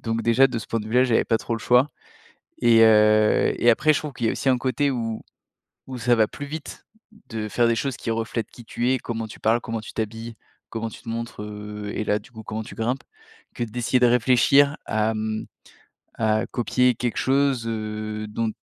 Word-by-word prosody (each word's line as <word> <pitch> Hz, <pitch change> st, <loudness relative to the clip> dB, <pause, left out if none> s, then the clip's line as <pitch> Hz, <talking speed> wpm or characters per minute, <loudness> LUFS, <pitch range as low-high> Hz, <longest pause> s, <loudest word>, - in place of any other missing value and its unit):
Donc 115 Hz, 0 st, -2 dB
déjà, 115 Hz, +4 st, +5 dB
de 125 Hz, -, -4 dB
ce -, -, -8 dB
point 115 Hz, -, -1 dB
de 105 Hz, -, -8 dB
vue 110 Hz, -, -7 dB
là, 125 Hz, -, +6 dB
j'avais 120 Hz, -3 st, +2 dB
pas 115 Hz, -, +1 dB
trop 115 Hz, -, -3 dB
le -, -, -3 dB
choix 125 Hz, +5 st, +3 dB, 0.7 s
et 115 Hz, -1 st, +6 dB
heu 110 Hz, -1 st, +5 dB
et 120 Hz, -, +5 dB
après 155 Hz, +7 st, +4 dB
je -, -, +1 dB
trouve 150 Hz, -2 st, -6 dB
qu'il 120 Hz, -, -2 dB
y -, -, +3 dB
a -, -, +1 dB
aussi -, -, -2 dB
un 130 Hz, -, +2 dB
côté 135 Hz, +3 st, 0 dB
où 115 Hz, -4 st, -3 dB, 0.7 s
où 130 Hz, -, -6 dB
ça 120 Hz, +1 st, +3 dB
va 110 Hz, -2 st, +3 dB
plus 145 Hz, -, -8 dB
vite 155 Hz, +1 st, -8 dB, 0.4 s
de 110 Hz, -1 st, -4 dB
faire 120 Hz, +2 st, +2 dB
des 115 Hz, -, +2 dB
choses 135 Hz, +2 st, -2 dB
qui 115 Hz, -, -3 dB
reflètent 115 Hz, 0 st, -3 dB
qui 120 Hz, -, -13 dB
tu 120 Hz, +2 st, -1 dB
es, 130 Hz, -, +2 dB
comment 115 Hz, -2 st, -5 dB
tu 110 Hz, -, -12 dB
parles, 115 Hz, +2 st, +2 dB
comment 115 Hz, -1 st, -4 dB
tu -, -, -10 dB
t'habilles, 115 Hz, +1 st, -5 dB, 0.3 s
comment 115 Hz, 0 st, -4 dB
tu -, -, -12 dB
te -, -, -20 dB
montres, 115 Hz, -1 st, -5 dB
heu, 105 Hz, 0 st, -7 dB
et -, -, -2 dB
là 105 Hz, 0 st, +1 dB
du -, -, -19 dB
coup 110 Hz, -2 st, -10 dB
comment 110 Hz, +1 st, -5 dB
tu -, -, -11 dB
grimpes. 125 Hz, +4 st, -2 dB, 0.5 s
Que -, -, -2 dB
d'essayer 120 Hz, +2 st, 0 dB
de 125 Hz, -, +5 dB
réfléchir 130 Hz, +4 st, +4 dB
à, 110 Hz, 0 st, 0 dB
mmh, 110 Hz, 0 st, -3 dB, 0.7 s
à 110 Hz, -1 st, +1 dB
copier 125 Hz, +1 st, +1 dB
quelque 120 Hz, +1 st, -2 dB
chose, 135 Hz, -3 st, +1 dB
heu, 110 Hz, -1 st, -4 dB
dont 110 Hz, +1 st, -2 dB
115 Hz, 225 wpm, -24 LUFS, 110-125 Hz, 0.7 s, là